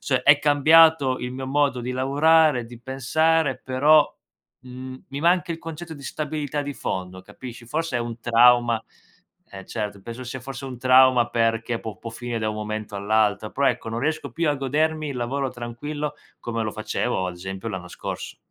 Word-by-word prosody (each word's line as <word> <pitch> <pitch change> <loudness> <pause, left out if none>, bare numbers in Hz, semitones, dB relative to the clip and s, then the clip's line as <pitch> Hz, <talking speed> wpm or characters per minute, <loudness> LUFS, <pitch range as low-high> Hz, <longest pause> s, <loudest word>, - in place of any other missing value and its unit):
cioè, 130 -2 0
è 145 0 +6
cambiato 150 -1 +5
il 125 0 -5
mio 130 0 -5
modo 140 -2 +1
di 125 +1 -4
lavorare, 140 0 +3
di 120 0 -12
pensare, 140 +3 +1
però, 145 +4 +5 0.5
mhmm, 130 0 -9
mi 140 +1 -5
manca 175 +1 +2
il 165 - -6
concetto 165 0 -8
di 140 - -12
stabilità 150 0 -3
di 145 -1 -5
fondo, 95 0 -5
capisci? 120 +4 -10
Forse 155 +1 -2
è - - -1
un 120 0 -5
trauma 120 -1 +4 0.7
eh, 95 -1 -9
certo, 105 -3 -4
penso 115 +5 -8
sia 125 +1 -6
forse 135 +1 -7
un 130 -2 -7
trauma 130 -1 +5
perché 115 0 0
può 105 -4 -8
può 115 - -7
finire 120 0 -4
da 110 -1 -1
un 110 - -3
momento 105 0 -5
all'altro. 105 0 +1
Però, 140 0 +1
ecco, 115 - 0
non 115 - -3
riesco 150 -1 -2
più 165 +1 0
a 145 - +2
godermi 155 +3 0
il 130 - -5
lavoro 130 +3 -2
tranquillo, 145 +5 -5 0.3
come 115 -1 -3
lo 110 - -2
facevo, 110 -2 -2
ad 90 - -5
esempio, 95 +4 -6
l'anno 90 -4 -6
scorso. - - -6
130 Hz, 185 wpm, -24 LUFS, 115-145 Hz, 0.7 s, è